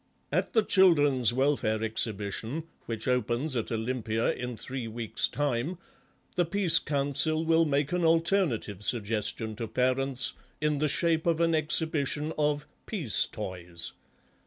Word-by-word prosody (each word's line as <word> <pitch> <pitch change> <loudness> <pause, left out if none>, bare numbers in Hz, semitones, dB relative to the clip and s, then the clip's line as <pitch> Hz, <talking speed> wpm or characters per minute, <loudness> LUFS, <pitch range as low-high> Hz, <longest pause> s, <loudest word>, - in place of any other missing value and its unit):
At - - 0
the 220 - +4
Children's 145 - +4
Welfare 120 -4 +1
Exhibition, 110 +5 -2 0.2
which 115 0 -4
opens 125 +3 0
at 115 -1 -2
Olympia 115 -1 -1
in 125 -2 -5
three 130 -1 -5
weeks' 110 -1 -1
time, 145 +4 -1 0.6
the 175 - +3
Peace 180 0 +3
Council 145 +3 +1
will 165 0 +4
make 145 -1 0
an 180 -1 0
alternative 165 - +2
suggestion 110 0 -1
to 115 -1 -3
parents 130 +2 0 0.3
in 150 -1 0
the 155 - +2
shape 165 +2 +1
of 165 -1 +2
an 165 0 +3
exhibition 155 -1 0
of 150 -1 0 0.2
'peace 160 - +1
toys. 90 -2 -4
135 Hz, 135 wpm, -29 LUFS, 115-160 Hz, 0.6 s, the